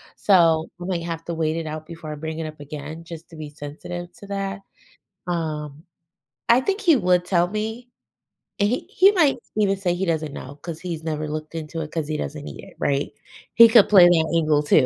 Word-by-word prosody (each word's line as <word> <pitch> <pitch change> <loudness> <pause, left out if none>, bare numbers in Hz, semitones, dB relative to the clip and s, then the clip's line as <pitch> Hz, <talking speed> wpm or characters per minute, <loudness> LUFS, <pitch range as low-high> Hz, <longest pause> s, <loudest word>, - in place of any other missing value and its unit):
so 165 -5 +4
I 175 - -6
might 180 -3 -2
have 165 -1 -5
to 170 - -3
wait 160 0 -1
it 165 - -3
out 155 0 -6
before 165 -2 -8
I - - -6
bring 160 +1 -5
it 160 - -3
up 155 -1 -10
again 150 +2 -8
just 165 0 -10
to - - -11
be 155 -1 -7
sensitive 155 +4 -8
to 200 - -11
that. 195 0 -4 0.7
Um, 155 -3 -3 0.7
I 235 +2 +6
think 395 +9 -1
he 335 -8 +5
would 180 -4 +2
tell 175 -1 +2
me. 220 +4 -4 0.7
He 210 +5 0
he 390 +2 +6
might 315 -9 +3 0.2
even 195 -2 +2
say 180 -3 0
he 190 +2 -1
doesn't 155 -3 -1
know 140 +2 -8
'cause 165 -2 -6
he's 170 -3 -5
never 155 -1 -3
looked 155 +1 -6
into 160 +1 -5
it 155 -1 -6
'cause 160 -3 -3
he 155 - -2
doesn't 150 0 -5
need - - -9
it, - - -14
right? 140 0 0 0.4
He 230 0 +10
could 225 -3 +6
play 190 -4 +8
that 165 -2 +2
angle 155 -2 +3
too. 145 -2 +4
165 Hz, 215 wpm, -23 LUFS, 155-195 Hz, 0.7 s, He